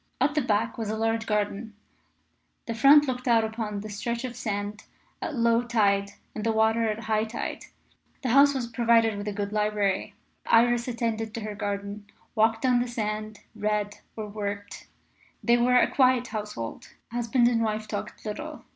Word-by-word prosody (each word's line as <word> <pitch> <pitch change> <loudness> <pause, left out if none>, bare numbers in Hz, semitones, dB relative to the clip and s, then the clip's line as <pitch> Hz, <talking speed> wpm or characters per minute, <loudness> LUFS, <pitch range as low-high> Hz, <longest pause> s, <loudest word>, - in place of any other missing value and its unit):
At 275 +3 +2
the 300 - +2
back 225 -1 0
was 220 -2 -3
a 220 - -2
large 225 0 0
garden, 210 +1 -2 0.9
the 230 - -3
front 280 +6 +7
looked 250 0 -3
out 230 -2 +4
upon 220 -2 -3
the 215 - -7
stretch 235 +4 -3
of 250 -2 -5
sand 210 -2 -4 0.4
at 305 - -3
low 230 -1 +3
tide 200 -4 +1 0.2
and 215 - -5
the 225 - +2
water 220 +1 +2
at 215 +1 -3
high 215 -1 +1
tide. 225 +1 -5 0.6
The 255 - 0
house 280 +3 +6
was 255 -3 -1
provided 230 -2 +3
with 205 +1 -5
a - - -1
good 200 0 -4
library. 210 -2 0 0.3
Iris 240 +1 +4
attended 225 -2 -2
to 230 - -4
her 210 0 -4
garden, 205 0 -4 0.3
walked 225 +1 +2
on 250 -1 +4
the 245 - -1
sands, 215 -2 -4
read, 210 -1 -1 0.2
or 215 -1 -5
worked. 205 -1 -6 0.6
They 235 0 +4
were 250 +1 +4
a - - +4
quiet 255 -2 +3
household. 210 - -6 0.2
Husband 240 +1 +2
and 235 -1 +2
wife 215 -1 -1
talked 210 +2 -6
little. 305 +9 -6
220 Hz, 175 wpm, -27 LUFS, 210-235 Hz, 0.9 s, front